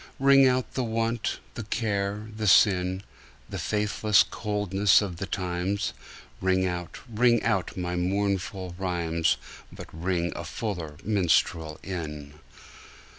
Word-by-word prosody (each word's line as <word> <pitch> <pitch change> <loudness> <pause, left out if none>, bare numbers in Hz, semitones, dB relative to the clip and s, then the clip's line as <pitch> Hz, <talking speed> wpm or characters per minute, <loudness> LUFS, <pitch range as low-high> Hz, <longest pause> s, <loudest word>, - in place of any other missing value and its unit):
Ring 135 0 +6
out 130 -1 0
the 130 - -1
want, 115 0 -1 0.2
the - - -5
care 105 -1 -2
the 110 -1 -2
sin, 95 -1 +4 0.5
The - - -4
faithless 105 0 +3
coldness 105 -2 +2
of 95 -5 -4
the 100 - -4
times; 90 +2 -2 0.5
Ring 95 0 +2
out, 90 -2 -4
ring 120 0 +3
out 95 -6 0
my 90 -1 -2
mournful 95 0 -1
rhymes, 85 -3 0 0.3
But - - -9
ring 85 0 -1
the 85 - -6
fuller 85 -4 -5
minstrel 85 -5 +1
in. 75 -6 -6
95 Hz, 125 wpm, -27 LUFS, 90-105 Hz, 0.5 s, Ring